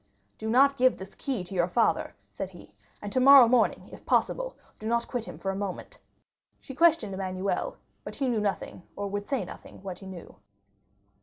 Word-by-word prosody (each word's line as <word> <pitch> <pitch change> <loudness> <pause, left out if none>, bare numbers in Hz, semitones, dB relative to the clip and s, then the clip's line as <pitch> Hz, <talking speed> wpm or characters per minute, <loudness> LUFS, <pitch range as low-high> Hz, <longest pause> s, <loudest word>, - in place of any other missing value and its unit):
"Do 220 - -3
not 275 +4 +5
give 255 0 +4
this 190 +1 -10
key 260 -9 -3
to 180 - -9
your 175 -2 +2
father," 230 +6 +1 0.2
said - - -5
he, - - -15 0.3
"and 205 - -5
tomorrow 260 0 +8
morning, 240 -1 +2
if - - -12
possible, - - 0 0.2
do 215 - -6
not 235 +1 0
quit 245 -3 -3
him - - -9
for 195 - -2
a - - -5
moment." 200 - -5 0.6
She 270 - -10
questioned 305 - +3
Emmanuel, 190 0 -2 0.3
but - - -7
he 275 - -1
knew 230 -4 +1
nothing, 200 -2 -3
or 205 0 -3
would 205 +4 -4
not 270 - -2
say - - -14
what 185 -2 -6
he 195 - -11
knew. 185 -3 -10
220 Hz, 195 wpm, -28 LUFS, 195-260 Hz, 0.6 s, tomorrow